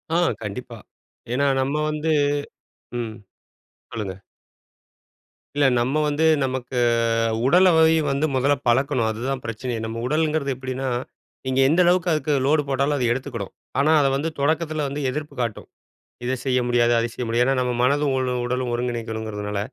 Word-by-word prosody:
ஆ, -, -, +4 dB, 0.3 s
கண்டிப்பா. 115 Hz, +3 st, -6 dB, 0.6 s
ஏன்னா 140 Hz, +3 st, +2 dB
நம்ம 135 Hz, +2 st, -1 dB
வந்து 155 Hz, +1 st, -1 dB, 0.9 s
ம். 110 Hz, -2 st, -4 dB, 0.8 s
சொல்லுங்க. 100 Hz, -4 st, -5 dB, 1.4 s
இல்ல, 145 Hz, -1 st, +3 dB
நம்ம 130 Hz, +5 st, 0 dB
வந்து 150 Hz, +2 st, +1 dB, 0.2 s
நமக்கு 130 Hz, -1 st, -4 dB, 0.7 s
உடல்லை 160 Hz, 0 st, +5 dB, 0.2 s
வந்து 140 Hz, +3 st, +1 dB
முதல்ல 140 Hz, +3 st, +3 dB
பழக்கணும். 120 Hz, -2 st, +2 dB
அதுதா 120 Hz, +5 st, -3 dB
பிரச்சனையே 115 Hz, +1 st, -4 dB
நம்ம 115 Hz, +1 st, -4 dB
உடலுங்குறது 155 Hz, 0 st, 0 dB
எப்படின்னா, 130 Hz, +1 st, -4 dB, 0.6 s
நீங்க 130 Hz, 0 st, 0 dB
எந்த 170 Hz, +4 st, +4 dB
அளவுக்கு 180 Hz, 0 st, +3 dB
அதுக்கு 155 Hz, -1 st, 0 dB
லோடு 150 Hz, +2 st, +3 dB
போட்டாலும் 140 Hz, +2 st, +1 dB
அதை 125 Hz, -, 0 dB
எடுத்துக்குடும். 125 Hz, -6 st, -5 dB, 0.3 s
ஆனா 150 Hz, +3 st, +3 dB
அத 135 Hz, -, +3 dB
வந்து 155 Hz, +4 st, -1 dB
தொடக்கத்துல 155 Hz, +1 st, 0 dB
வந்து 145 Hz, +2 st, -4 dB
எதிர்ப்பு 150 Hz, +2 st, -5 dB
காட்டும் 115 Hz, -4 st, -4 dB, 0.6 s
இதை 130 Hz, +1 st, 0 dB
செய்ய 125 Hz, -1 st, +2 dB
முடியாது, 120 Hz, -1 st, +3 dB
அதை 115 Hz, -, 0 dB
செய்ய 125 Hz, -, -4 dB
முடியாது 120 Hz, +2 st, +2 dB
ஏன்னா 135 Hz, -, +2 dB
நம்ம 125 Hz, -1 st, 0 dB
மனதும், 140 Hz, +2 st, +2 dB
உ 130 Hz, -, +1 dB, 0.2 s
உடலும் 125 Hz, 0 st, -2 dB
ஒருங்கிணைக்கணுங்கிறதுனால. 110 Hz, -4 st, -3 dB
130 Hz, 145 wpm, -23 LUFS, 120-150 Hz, 1.4 s, உடல்லை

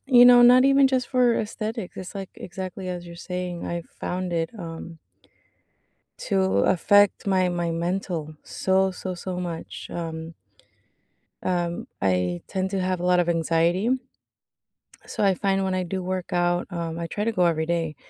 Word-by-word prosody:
you 245 Hz, -2 st, +7 dB
know, 245 Hz, 0 st, +8 dB
not 250 Hz, +2 st, +7 dB
even 275 Hz, 0 st, +6 dB
just 260 Hz, -2 st, 0 dB
for 250 Hz, -2 st, +3 dB
aesthetics. 215 Hz, -2 st, -4 dB
It's, 185 Hz, +2 st, -7 dB
like, 195 Hz, -1 st, -6 dB
exactly 185 Hz, +1 st, -6 dB
as 175 Hz, -1 st, -5 dB
you're 170 Hz, 0 st, -10 dB
saying. 180 Hz, -1 st, -5 dB
I 170 Hz, 0 st, -3 dB, 0.2 s
found 180 Hz, 0 st, -3 dB
it, 165 Hz, -1 st, -1 dB
um 165 Hz, -1 st, -8 dB, 1.3 s
to -, -, 0 dB, 0.3 s
affect 205 Hz, +3 st, +4 dB
my 185 Hz, -2 st, +2 dB
my 175 Hz, -1 st, -1 dB
mental 170 Hz, -2 st, -3 dB
so, 190 Hz, 0 st, +1 dB
so, 185 Hz, 0 st, -5 dB
so 180 Hz, 0 st, -5 dB
much, 170 Hz, -2 st, -6 dB
um 165 Hz, -1 st, -5 dB, 1.1 s
Um, 175 Hz, -2 st, -1 dB
I 90 Hz, -2 st, +1 dB
tend 190 Hz, 0 st, -2 dB
to 195 Hz, -2 st, -1 dB
have 185 Hz, -1 st, -1 dB
a 180 Hz, -, -3 dB
lot 180 Hz, 0 st, +4 dB
of 175 Hz, -, +1 dB
anxiety 170 Hz, +5 st, +1 dB, 1.2 s
so, -, -, -2 dB
I 195 Hz, -1 st, +4 dB
find 195 Hz, +1 st, 0 dB
when 190 Hz, -1 st, -1 dB
I 185 Hz, 0 st, 0 dB
do 185 Hz, +1 st, -4 dB
work 185 Hz, -1 st, -3 dB
out, 175 Hz, 0 st, +1 dB
um 170 Hz, -1 st, -4 dB
I 170 Hz, -, -3 dB
try 205 Hz, -, -3 dB
to 230 Hz, -, +1 dB
go 180 Hz, -5 st, +2 dB
every 160 Hz, -2 st, +1 dB
day. 165 Hz, -2 st, -1 dB
180 Hz, 170 wpm, -25 LUFS, 170-195 Hz, 1.3 s, know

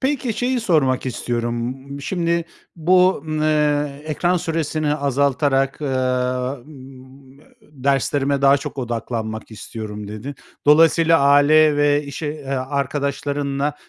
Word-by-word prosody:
Peki, 265 Hz, -3 st, -1 dB
şeyi 250 Hz, +3 st, -1 dB
sormak 145 Hz, -, +1 dB
istiyorum. 120 Hz, -1 st, -2 dB, 0.3 s
Imm, 140 Hz, 0 st, -6 dB
şimdi 170 Hz, +2 st, -1 dB, 0.3 s
bu 180 Hz, 0 st, +3 dB
n 155 Hz, 0 st, -1 dB
eee, 150 Hz, -2 st, +1 dB
"Ekran 175 Hz, +4 st, 0 dB
süresini 155 Hz, -2 st, -1 dB
azaltarak, 140 Hz, -1 st, 0 dB
ııı, 130 Hz, -1 st, -1 dB
ımm, 130 Hz, 0 st, -15 dB, 0.2 s
derslerime 140 Hz, 0 st, -1 dB
daha 140 Hz, 0 st, +6 dB
çok 140 Hz, -, -7 dB
odaklanmak 115 Hz, -3 st, -4 dB
istiyorum." 105 Hz, -1 st, -7 dB
dedin. 110 Hz, +7 st, -7 dB, 0.3 s
Dolayısıyla, 165 Hz, +2 st, +5 dB
aile 145 Hz, +2 st, +5 dB
ve 145 Hz, 0 st, +3 dB
iş 140 Hz, +2 st, -8 dB
e 150 Hz, -2 st, -5 dB
arkadaşlarınla 140 Hz, +1 st, -2 dB
140 Hz, 110 wpm, -20 LUFS, 130-155 Hz, 0.3 s, daha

